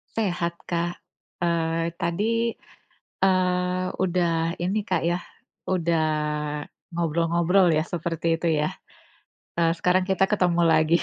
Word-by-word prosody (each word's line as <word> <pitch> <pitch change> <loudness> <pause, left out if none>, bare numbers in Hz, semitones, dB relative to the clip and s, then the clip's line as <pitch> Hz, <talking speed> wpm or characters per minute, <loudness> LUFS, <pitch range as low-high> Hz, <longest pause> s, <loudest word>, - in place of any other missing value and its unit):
Sehat, 175 -5 -1
Kak, 175 0 -1 0.5
eee, 165 0 0
tadi, 170 +4 -1 1.0
eee, 180 -1 +2 0.2
udah 170 -2 +1
ini, 195 +4 +1
Kak, - - +1
ya, 175 +1 0 0.5
udah 170 -3 +1 0.9
ngobrol-ngobrol 170 +3 +2
ya, 155 - +2
seperti 165 0 -2
itu 170 - -1
ya, 150 - +1 0.9
eee, 165 0 +3
sekarang 185 +1 +2
kita 190 0 +3
ketemu 180 -4 +2
lagi. 160 0 +4
170 Hz, 110 wpm, -25 LUFS, 165-180 Hz, 1.0 s, lagi